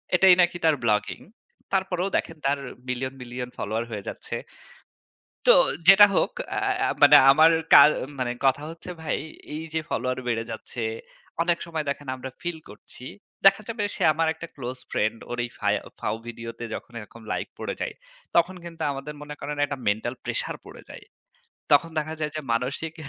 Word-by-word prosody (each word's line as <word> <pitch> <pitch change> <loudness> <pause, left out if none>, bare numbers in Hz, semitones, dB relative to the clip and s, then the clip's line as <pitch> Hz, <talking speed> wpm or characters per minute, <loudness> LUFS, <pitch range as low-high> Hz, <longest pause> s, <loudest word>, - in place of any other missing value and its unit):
এটাই 185 0 +7
নাকি 175 0 +2
তার 160 - +5
ব্লগিং। 105 -2 +1 0.5
তারপরেও 190 -1 0
দেখেন 165 - -4
তার 140 +1 +2 0.3
মিলিয়ন, 130 +1 -2
মিলিয়ন 125 0 -6
ফলোয়ার 110 +3 -2
হয়ে 105 -3 -5
যাচ্ছে। - - -6 1.1
তো - - +10 0.3
যেটা 195 +2 +10
হোক, - - +2 0.3
আ - - +2 0.4
মানে 145 0 +9 0.2
আমার 155 +3 +6 0.2
কা - - +12 0.4
মানে 125 -1 0
কথা 135 +2 +3
হচ্ছে 165 +2 -8
ভাই, 160 - -1 0.4
এই 160 - -4
যে 160 - +1
ফলোয়ার 130 +2 -1
বেড়ে 115 -1 0
যাচ্ছে, 120 - -6 0.6
অনেক 175 0 +2
সময় 160 -2 -4
দেখেন 140 0 -4
আমরা 130 +1 -7
feel 175 -1 -3
করছি। 105 +4 -12 0.4
দেখা 195 +2 +7
যাবে 225 -2 -2
সে - - -2
আমার 160 +1 +1
একটা 165 +1 -9
close 125 -1 -6
friend. 110 +2 0
ওর 120 - -4
এই 120 - -9
ফায় - - +2 0.2
ফাও 105 - -1
ভিডিওতে 115 0 -7
যখন 120 - -10
এরকম 115 +2 -12
লাইক - - -3
পড়ে - - -3
যায়, - - -2 0.4
তখন 170 +2 +3
কিন্তু 165 -1 -9
আমাদের 140 +2 -6
মনে 150 0 -7
করেন 145 +1 -4
একটা 140 -1 -5
mental 110 +4 0
pressure - - -2
পড়ে - - -12
যায়। - - -11 0.7
তখন 165 +3 +5
দেখা 155 +1 -2
যায় 150 -1 -2
যে - - -2
মানসিক 140 +7 -2
145 Hz, 170 wpm, -25 LUFS, 120-165 Hz, 1.1 s, কা